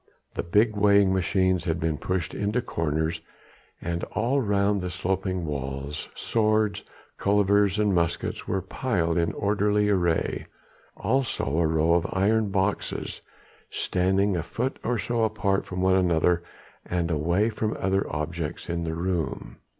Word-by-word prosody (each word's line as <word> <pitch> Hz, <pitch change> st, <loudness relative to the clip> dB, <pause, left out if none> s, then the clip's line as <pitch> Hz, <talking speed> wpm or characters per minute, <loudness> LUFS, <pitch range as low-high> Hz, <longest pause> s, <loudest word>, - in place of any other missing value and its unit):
The -, -, -2 dB
big 105 Hz, +5 st, +2 dB
weighing 100 Hz, -2 st, +4 dB
machines 95 Hz, -1 st, +1 dB
had 85 Hz, -1 st, 0 dB
been 80 Hz, -2 st, -1 dB
pushed 95 Hz, -2 st, -2 dB
into 105 Hz, +4 st, 0 dB
corners, 80 Hz, -6 st, -1 dB, 0.6 s
and 85 Hz, 0 st, -3 dB
all 125 Hz, +6 st, 0 dB
round 100 Hz, -2 st, +1 dB
the 90 Hz, -, -3 dB
sloping 95 Hz, +1 st, -2 dB
walls 70 Hz, 0 st, -4 dB
swords, 110 Hz, -2 st, +1 dB, 0.4 s
cullivers 100 Hz, 0 st, +3 dB
and 105 Hz, -2 st, +2 dB
muskets 85 Hz, -1 st, -1 dB
were 95 Hz, -2 st, -1 dB
piled 95 Hz, -7 st, -1 dB
in 85 Hz, -, +1 dB
orderly 105 Hz, 0 st, +1 dB
array, 85 Hz, -5 st, 0 dB, 0.5 s
also 130 Hz, -, 0 dB
a 85 Hz, -, +3 dB
row 80 Hz, +1 st, +2 dB
of 85 Hz, -1 st, +2 dB
iron 105 Hz, +3 st, +2 dB
boxes 95 Hz, +1 st, -2 dB, 0.5 s
standing 95 Hz, +2 st, +1 dB
a 85 Hz, -, 0 dB
foot 115 Hz, +11 st, -3 dB
or 120 Hz, +1 st, 0 dB
so 115 Hz, +3 st, 0 dB
apart 100 Hz, -3 st, 0 dB
from 90 Hz, 0 st, -4 dB
one 95 Hz, 0 st, +4 dB
another 85 Hz, -2 st, +3 dB, 0.4 s
and 85 Hz, -1 st, -1 dB
away 85 Hz, +8 st, +1 dB
from 110 Hz, 0 st, -2 dB
any -, -, -8 dB
other 95 Hz, +1 st, +1 dB
objects 80 Hz, +2 st, -4 dB
in 85 Hz, 0 st, -2 dB
the 80 Hz, 0 st, -2 dB
room. 85 Hz, -1 st, -3 dB
95 Hz, 145 wpm, -26 LUFS, 85-105 Hz, 0.6 s, weighing